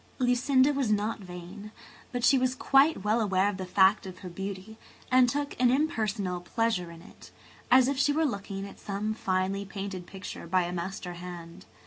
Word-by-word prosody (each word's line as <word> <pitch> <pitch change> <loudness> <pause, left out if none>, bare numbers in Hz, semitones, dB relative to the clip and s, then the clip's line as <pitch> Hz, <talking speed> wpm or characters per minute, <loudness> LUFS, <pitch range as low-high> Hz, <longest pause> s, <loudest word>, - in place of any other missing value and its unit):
Lucinda 260 +2 +3
was 275 -5 0
not 210 +2 0
vain, 185 +3 -9 0.4
but 245 -1 -3
she 270 - +6
was 255 0 +1
quite 275 -1 +3
well 215 +3 +2
aware 190 -2 +2
of 205 -2 -2
the 185 -1 -5
fact 190 +1 +4
of 185 -1 -9
her - - -5
beauty 195 +4 -7 0.3
and 255 -1 +5
took 285 +2 -2
an 250 - +5
impersonal 215 - 0
pleasure 185 -1 -1
in 165 0 -12
it, - - -15 0.4
as 255 0 +6
if 275 -1 -1
she 290 - +3
were 315 +2 +1
looking 200 -5 -4
at - - -13
some 210 +1 -3
finely 190 -1 -1
painted 195 -2 -6
picture 190 -3 -8
by 185 +1 +2
a 175 +1 -4
master 180 0 -5
hand. 175 0 -9
200 Hz, 185 wpm, -28 LUFS, 185-245 Hz, 0.4 s, she